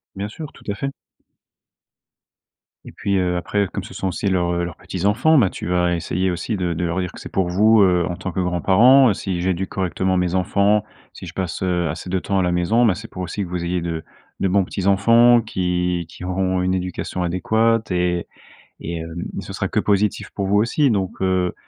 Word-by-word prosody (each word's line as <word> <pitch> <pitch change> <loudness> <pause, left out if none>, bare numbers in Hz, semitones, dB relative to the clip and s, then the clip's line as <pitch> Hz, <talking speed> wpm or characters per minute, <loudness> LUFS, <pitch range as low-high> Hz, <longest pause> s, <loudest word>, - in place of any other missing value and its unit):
Bien 100 +1 -3
sûr, 155 +6 -8
tout - - -17
à 100 - -1
fait. 135 +5 -3 1.9
Et - - -10
puis, 100 -1 -1
heu, 90 -1 0
après, 100 +3 -1
comme - - -3
ce - - -10
sont 95 - -3
aussi 95 - -3
leurs, 90 -2 +1
heu, 85 0 -1
leurs 85 -2 -6
petits-enfants, 105 - +1
bah, 100 -8 +4
tu - - -7
vas 90 0 +1
essayer 90 +2 -1
aussi 95 +5 -3
de 90 -3 -1
de 85 +2 -2
leur 85 +2 -1
dire 90 -1 -3
que: - - -12
«C'est - - -9
pour 95 -2 0
vous, 110 +4 +5
heu, 90 -3 +3
en 90 - -3
tant 95 - -5
que 90 - -3
grands-parents, 105 +8 +5
si 95 -2 -3
j'éduque 95 +1 -1
correctement 95 0 -1
mes 90 0 0
enfants, 100 +3 +2 0.3
si - - -10
je - - -9
passe, 95 -3 -4
heu, 90 -3 0
assez 80 +3 -6
de 95 +1 0
temps 100 +1 -1
à - - +2
la 90 - +1
maison, 95 +8 +2
ben, 105 - +4
c'est 105 +5 -8
pour 90 - -6
aussi 100 +3 -3
que - - -6
vous 90 -1 -3
ayez 90 +1 -1
de 85 -1 -4 0.4
de 95 - +1
bons 95 +1 +3
petits-enfants 115 +6 +4
qui 90 -4 -1
qui 85 - -12
auront 95 0 0
une 95 +1 +1
éducation 90 0 -3
adéquate 110 +6 +1
et 90 -1 0 0.5
et 85 - -5
hem, 80 +1 -6 0.2
ce - - -8
sera - - -2
que - - 0
positif 105 0 0
pour 100 -2 -3
vous 100 - +2
aussi 120 +7 +2
donc, 95 -5 -2
heu» 95 -1 +1
95 Hz, 220 wpm, -21 LUFS, 90-100 Hz, 1.9 s, vous